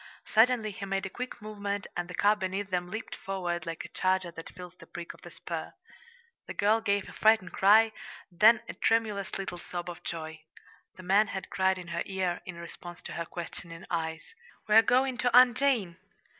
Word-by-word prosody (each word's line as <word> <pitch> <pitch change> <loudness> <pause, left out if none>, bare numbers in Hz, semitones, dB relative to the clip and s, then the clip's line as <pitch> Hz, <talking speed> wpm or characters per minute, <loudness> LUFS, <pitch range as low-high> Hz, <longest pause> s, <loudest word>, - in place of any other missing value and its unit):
Suddenly 225 -1 +3
he 195 - -8
made 195 0 -2
a 195 - -5
quick 250 -2 -6
movement, 205 -1 -4
and 175 0 -2
the 180 - -6
car 205 +4 +4
beneath 195 0 -3
them 180 -1 -1
leaped 220 +3 -5
forward 175 -4 -3
like 165 -1 -4
a - - -9
charger 185 -2 0
that 165 -1 -9
feels 180 0 -10
the - - -14
prick 175 -1 -7
of - - -19
the - - -10
spur. - - -6 0.7
The - - -6
girl 215 +2 +3
gave 200 -2 0
a - - -10
frightened 215 -4 +3
cry, 220 +3 +6 0.4
then 220 +6 +6
a - - -5
tremulous 215 -4 0
little 190 -2 -5
sob 175 0 -5
of 175 0 -11
joy. 160 -1 -5 0.5
The 185 - -11
man 200 +4 +4
had 190 -1 -6
cried 190 0 +2
in 175 -2 -8
her 170 0 -2
ear, 190 -2 -1
in 185 - -6
response 170 +1 -10
to - - -7
her 170 - -3
questioning 170 0 -8
eyes: 160 -2 -2 0.4
"We're 215 +1 +8
going 255 +2 +2
to 245 -1 +4
Aunt 250 -1 +8
Jane!" 245 -11 +1
190 Hz, 200 wpm, -29 LUFS, 175-215 Hz, 0.7 s, We're